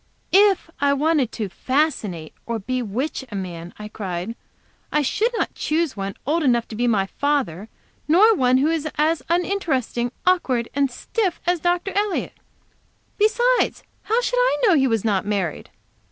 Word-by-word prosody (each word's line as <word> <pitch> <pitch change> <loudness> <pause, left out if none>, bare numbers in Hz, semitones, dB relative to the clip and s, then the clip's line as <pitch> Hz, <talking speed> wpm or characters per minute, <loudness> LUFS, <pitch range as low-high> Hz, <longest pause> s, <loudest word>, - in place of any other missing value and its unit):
"If 395 -2 +5
I 280 0 +3
wanted 285 -4 +1
to 215 -3 -3
'fascinate' 215 - -1
or 235 -1 -1
'bewitch' 250 +5 -3
a - - -5
man," 175 -3 -6
I 210 - -7
cried, 195 0 -5 0.6
"I 300 - +2
should 425 - +1
not - - -1
choose 315 -1 -1
one 195 -1 -4
old 320 +5 +1
enough 240 -5 +2
to 220 - -7
be 240 +2 0
my 205 -5 +2
father, 225 - -1 0.4
nor 395 +9 +6
one 255 -8 +3
who 285 +4 +2
was 320 -2 -1
as 310 0 +2
uninteresting, 330 - 0
awkward 265 -11 +1
and 280 -1 +1
stiff 370 - -2
as 350 0 +1
Dr. 350 +3 0
Elliott. 410 -1 -1 0.9
Besides, 485 +4 +2 0.2
how 450 +3 +2
should - - 0
I - - +3
know 395 - +5
he 270 -4 +4
was 225 -3 0
not 200 -4 +1
married? 195 -6 -2
275 Hz, 160 wpm, -22 LUFS, 220-350 Hz, 0.9 s, nor